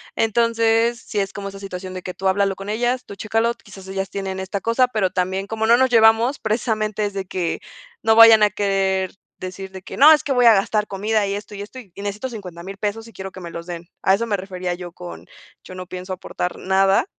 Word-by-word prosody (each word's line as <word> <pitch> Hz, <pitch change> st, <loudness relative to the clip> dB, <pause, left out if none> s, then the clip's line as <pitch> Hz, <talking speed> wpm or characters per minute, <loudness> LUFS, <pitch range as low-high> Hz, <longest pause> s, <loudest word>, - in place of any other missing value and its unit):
Entonces, 230 Hz, +1 st, +2 dB
sí 210 Hz, -, -2 dB
es 195 Hz, -1 st, -1 dB
como 200 Hz, -1 st, -6 dB
esa 195 Hz, -, -10 dB
situación 185 Hz, -1 st, -7 dB
de 185 Hz, -, -6 dB
que 180 Hz, -, -6 dB
tú 190 Hz, -, -2 dB
háblalo 195 Hz, 0 st, +2 dB
con 195 Hz, +1 st, -8 dB
ellas, 245 Hz, +4 st, 0 dB
tú -, -, -9 dB
chécalo, 225 Hz, +3 st, 0 dB
quizás 195 Hz, -4 st, -14 dB
ellas 195 Hz, 0 st, -3 dB
tienen 190 Hz, -1 st, -4 dB
esta 190 Hz, +1 st, -3 dB
cosa, 240 Hz, +2 st, +2 dB
pero 215 Hz, -6 st, +1 dB
también 190 Hz, +2 st, -1 dB
como 220 Hz, +1 st, -2 dB
no 230 Hz, +1 st, +6 dB
nos 260 Hz, +1 st, +3 dB
llevamos, 230 Hz, +3 st, +5 dB
precisamente 215 Hz, -1 st, -1 dB
es 205 Hz, -, -3 dB
de 195 Hz, -1 st, -4 dB
que 180 Hz, -2 st, -3 dB, 0.4 s
no 220 Hz, -, +4 dB
vayan 225 Hz, -1 st, +9 dB
a 210 Hz, -, +5 dB
querer 195 Hz, -2 st, 0 dB, 0.3 s
decir 185 Hz, +1 st, -7 dB
de 190 Hz, -1 st, -9 dB
que: -, -, -9 dB
"No, 300 Hz, +3 st, +9 dB
es 305 Hz, -, +5 dB
que 275 Hz, -, 0 dB
voy 250 Hz, -1 st, +3 dB
a 230 Hz, -, +9 dB
gastar 210 Hz, +1 st, +1 dB
comida 210 Hz, +2 st, 0 dB
y 195 Hz, -, -2 dB
esto, 205 Hz, 0 st, -8 dB
y 200 Hz, -, -6 dB
esto 220 Hz, +5 st, -9 dB
y 210 Hz, -7 st, -14 dB
necesito 205 Hz, +5 st, -4 dB
$50000 195 Hz, -4 st, -8 dB
pesos 215 Hz, +3 st, -3 dB
y 230 Hz, -, -15 dB
quiero 190 Hz, 0 st, -7 dB
que 185 Hz, -, -11 dB
me 170 Hz, -1 st, -7 dB
los 170 Hz, 0 st, -7 dB
den". 170 Hz, -1 st, -7 dB
A 190 Hz, -, +4 dB
eso 230 Hz, +4 st, 0 dB
me 205 Hz, -3 st, 0 dB
refería 185 Hz, -1 st, -4 dB
yo 175 Hz, 0 st, -7 dB
con: 175 Hz, 0 st, -10 dB, 0.4 s
"Yo 185 Hz, -, -11 dB
no 185 Hz, -1 st, -7 dB
pienso 185 Hz, +1 st, -7 dB
aportar 180 Hz, 0 st, -4 dB
nada 195 Hz, +3 st, +3 dB
200 Hz, 235 wpm, -21 LUFS, 190-225 Hz, 0.4 s, vayan